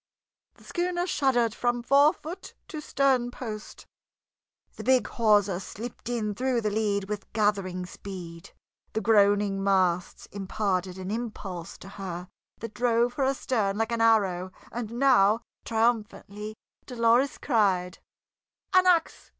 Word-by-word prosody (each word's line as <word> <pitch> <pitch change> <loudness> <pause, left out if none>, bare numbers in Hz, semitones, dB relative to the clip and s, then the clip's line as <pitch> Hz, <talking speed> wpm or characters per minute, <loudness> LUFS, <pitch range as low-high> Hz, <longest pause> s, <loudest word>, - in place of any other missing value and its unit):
The - - -20
schooner 350 0 -1
shuddered 250 - +1
from 240 0 -1
forefoot 300 +7 +2
to 310 - -6
sternpost; 245 -6 -1 0.9
the - - -8
big 255 -3 +3
hawser 205 -5 +2
slipped 225 +6 -8
in 220 -4 -1
through 250 +2 0
the 210 -1 -1
lead 205 -2 0
with 210 -1 -6
gathering 195 -4 0
speed; 180 -3 -9 0.4
the 220 - -1
groaning 205 -2 +3
masts 185 -3 +1
imparted 190 -2 -2
an 190 +1 -5
impulse 205 -7 -5
to - - -12
her 185 -3 -6 0.3
that 230 -1 -6
drove 240 0 +2
her 270 +1 0
astern 230 -7 0
like 225 +1 -1
an 230 -1 0
arrow, 195 -5 +3 0.2
and 230 -2 -5
now, 235 -4 +4 0.2
triumphantly, 215 -2 -1 0.3
Dolores 240 +2 +2
cried: 190 -8 +1 0.7
"An 370 0 +5
ax! 340 -3 +2
220 Hz, 125 wpm, -27 LUFS, 195-245 Hz, 0.9 s, An